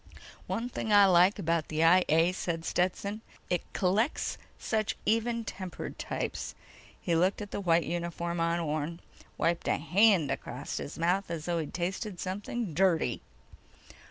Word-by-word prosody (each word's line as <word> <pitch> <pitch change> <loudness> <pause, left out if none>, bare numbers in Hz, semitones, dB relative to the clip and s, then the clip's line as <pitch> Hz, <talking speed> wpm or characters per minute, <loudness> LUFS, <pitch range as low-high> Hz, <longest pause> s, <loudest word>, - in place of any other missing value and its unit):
"One 230 +2 -2
thing 220 -3 -4
I 205 -1 +8
like 185 +1 +5
about 165 -4 0
the 155 +1 0
I 180 +3 +6
A," 165 +3 +4
said 170 -3 -3
Stetson. 200 +4 -1 0.3
"It 180 - +2
collects 205 +9 0 0.2
such 215 -2 -1
even 230 +2 +1
tempered 185 -3 -6
types." - - -4 0.4
He 170 - -1
looked 180 +4 +2
at 205 -1 -7
the - - -3
white 170 -2 +3
uniform 170 0 -3
on 170 +1 +1
Orne, 155 +1 -2 0.4
wiped 170 0 0
a - - +2
hand 185 -3 +4
across - - -5
his - - -6
mouth 180 +4 +1
as 165 -2 -4
though 170 -1 0
he'd 155 - -5
tasted 185 +2 -3
something 200 +1 -3
dirty. 165 -8 +2
180 Hz, 155 wpm, -30 LUFS, 165-200 Hz, 0.4 s, I